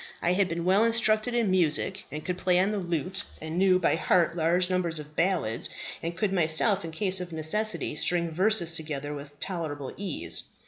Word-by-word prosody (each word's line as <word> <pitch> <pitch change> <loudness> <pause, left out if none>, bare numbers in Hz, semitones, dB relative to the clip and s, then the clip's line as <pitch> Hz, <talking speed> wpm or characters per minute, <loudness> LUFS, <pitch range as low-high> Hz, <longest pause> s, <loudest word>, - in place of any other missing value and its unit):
I 175 - +1
had 190 0 +2
been 170 0 -3
well 195 +4 +4
instructed 230 0 +3
in 230 -5 +2
music 185 +2 +1
and 150 +1 -6
could 180 0 -3
play 180 -1 +2
on 190 +3 +3
the 210 - -1
lute, 175 +1 -2 0.2
and 160 +1 -6
knew 190 -1 +5
by 175 -3 +2
heart 170 -1 +2
large 175 +2 +2
numbers 180 -3 +1
of 150 0 -7
ballads, 165 - 0 0.3
and 170 +1 -4
could 195 +1 0
myself, 175 +4 +2
in 165 - -5
case 185 +3 -1
of 180 -1 -6
necessity, 165 +6 -1
string 170 +1 0
verses 185 0 +2
together 150 -3 -4
with 145 0 -9
tolerable 155 -7 -4
ease. 190 -5 -2
175 Hz, 190 wpm, -28 LUFS, 160-190 Hz, 0.3 s, knew